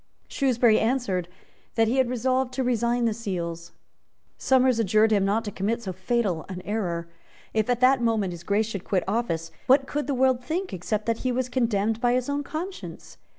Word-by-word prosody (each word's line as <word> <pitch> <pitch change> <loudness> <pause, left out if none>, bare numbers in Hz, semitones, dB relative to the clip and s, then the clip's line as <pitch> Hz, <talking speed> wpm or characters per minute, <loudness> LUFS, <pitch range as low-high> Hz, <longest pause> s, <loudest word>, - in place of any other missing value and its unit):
Shrewsbury 245 -5 +3
answered 220 -7 0 0.5
that 225 -1 +3
he 245 +4 +1
had 260 -2 +3
resolved 255 +1 0
to 265 - 0
resign 240 0 +1
the 225 - +2
seals. 170 -6 -5 0.6
Somers 260 -2 +3
adjured 215 +1 +3
him 205 -2 +3
not 215 +3 0
to 205 - -4
commit 225 +5 -2
so 190 - -4
fatal 190 -3 -1
an 185 -1 -6
error. 175 -6 -2 0.5
If 220 +1 0
at 245 0 +1
that 255 0 +5
moment 220 -6 +1
His 170 - -9
Grace 205 +4 +1
should 200 -4 -5
quit 190 -3 0
office, 180 -7 -1 0.2
what 270 +1 +5
could 295 +1 -3
the 280 - 0
world 255 -1 +2
think, 355 +7 -3
except 210 +4 -2
that 230 -1 0
he 255 - -1
was 250 0 -1
condemned 225 -3 0
by 245 -1 +3
his 255 +1 0
own 285 0 0
conscience? 350 +7 -7
230 Hz, 195 wpm, -25 LUFS, 200-255 Hz, 0.6 s, that